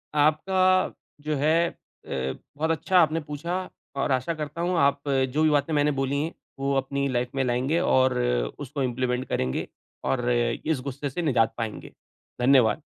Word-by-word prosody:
आपका 185 +5 +3 0.3
जो 150 +1 -1
है 160 +4 +3
अ, 65 0 -6 0.2
बहुत 160 +2 +1
अच्छा 165 +4 +1
आपने 160 -1 +3
पूछा 170 +5 -4 0.3
और 135 - 0
आशा 130 +5 +1
करता 155 +1 -5
हूँ 175 +1 0
आप 140 0 +3
जो 135 +2 +1
भी 155 - +5
बातें 145 +1 +1
मैंने 150 0 +3
बोली 140 0 -1
है 165 - -4 0.3
वो 140 0 0
अपनी 140 +1 -1
लाइफ़ 125 -1 -1
में 135 - +1
लाएँगे 130 +6 +1
और 130 -7 +3 0.4
उसको 140 0 -3
इंप्लीमेंट 125 0 -1
करेंगे 65 0 -1 0.4
और 125 -2 0
इस 120 +5 0
गुस्से 140 +1 -4
से 155 +7 -3
निजात 120 -8 +2
पाएँगे। 110 -3 -5 0.5
धन्यवाद। 130 +1 +4
140 Hz, 160 wpm, -26 LUFS, 130-155 Hz, 0.5 s, भी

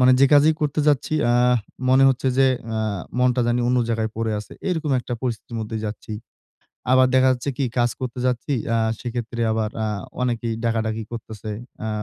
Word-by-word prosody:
মানে 125 0 +6
যে 140 - +8
কাজেই 150 +2 +6
করতে 150 0 0
যাচ্ছি, 145 +1 +1 0.2
আ - - +3 0.5
মনে 130 +1 +6
হচ্ছে 130 0 +1
যে 135 - +6 0.3
আ - - 0 0.4
মনটা 125 0 +3
জানি 120 +1 +1
অন্য 125 0 +3
জায়গায় 110 -1 -1
পড়ে 115 -1 -1
আছে। 105 - -9 0.2
এরকম 160 -5 -1
একটা 120 - -7
পরিস্থিতির 120 -1 -4
মধ্যে 110 +1 -4
যাচ্ছি। 105 +1 -7 0.8
আবার 130 0 +6
দেখা 130 0 +5
যাচ্ছে 130 +2 -3
কি? 140 - 0
কাজ 120 0 +3
করতে 125 -1 -4
যাচ্ছি 125 +3 -1 0.2
আ - - +3 0.2
সেক্ষেত্রে 120 -1 -4
আবার 110 -1 -1
আ - - 0 0.4
অনেকেই 120 -2 -1
ডাকাডাকি 110 -1 0
করতেছে। 110 -2 -7 0.4
আ - - -2
120 Hz, 180 wpm, -22 LUFS, 115-130 Hz, 0.8 s, যে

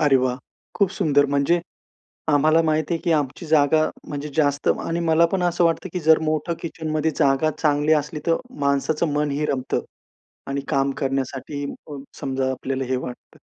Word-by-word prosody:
अरे 145 -3 +5
वाह! 125 -1 0 0.4
खूप 200 -2 +3
सुंदर 145 -7 +3
म्हणजे 140 +5 +2 0.7
आम्हाला 155 +2 +4
माहिती 155 +1 0
आहे, 165 - -3
की 170 - +1
आमची 150 +2 -1
जागा 155 0 +4 0.3
म्हणजे 145 0 -4
जास्त 145 -2 +1 0.2
आणि 165 +1 -2
मला 165 0 +4
पण 190 -2 +1
असं 175 0 +2
वाटतं, 165 +3 +1
की 180 - -2
जर 160 0 +5
मोठं 155 +2 -1
किचन 160 -1 -5
मध्ये 155 +1 +1
जागा 135 +3 +3
चांगली 150 0 +2
असली 150 0 0
तर 165 -1 +3 0.2
माणसाचं 140 +3 +1
मनही 150 0 0
रमतं. 130 -2 -1 0.7
आणि 140 0 -2
काम 140 -2 +1
करण्यासाठी 135 +1 -3 0.3
अ, - - -5 0.2
समजा 135 -2 -1
आपल्याला 130 +1 -3
हे 130 +1 -1
वाटतं. 125 -1 -7
150 Hz, 170 wpm, -23 LUFS, 140-160 Hz, 0.7 s, अरे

